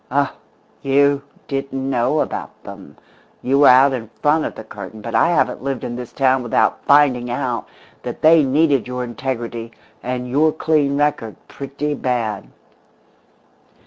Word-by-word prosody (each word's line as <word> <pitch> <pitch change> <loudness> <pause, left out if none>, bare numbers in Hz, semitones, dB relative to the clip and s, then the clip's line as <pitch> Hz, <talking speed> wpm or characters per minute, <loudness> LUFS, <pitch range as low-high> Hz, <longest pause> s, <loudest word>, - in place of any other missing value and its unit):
Oh, 140 +1 0 0.5
you 140 +1 +2 0.3
didn't 135 -1 -3
know 130 +3 +1
about - - -5
them; - - -12 0.5
you 135 +2 +2
were 145 - +7
out 135 +2 +6
in 115 -4 -5
front 150 +2 +3
of - - -5
the 110 - -8
curtain, 110 0 -10
but 115 +2 -7
I - - +4
haven't 175 - +1
lived 135 -1 -3
in 120 - -4
this 125 -1 -7
town 130 -1 +2
without 120 -2 0
finding 135 -4 +4
out 120 0 -3 0.3
that - - -7
they 160 +1 +7
needed 140 -1 +2
your 125 0 -4
integrity 120 -2 -5 0.3
and 125 0 -4
your 150 +5 +2
clean 150 -3 +1
record 145 -7 -1
pretty 140 +2 -4
bad! 120 -6 -2
135 Hz, 150 wpm, -19 LUFS, 120-145 Hz, 0.5 s, were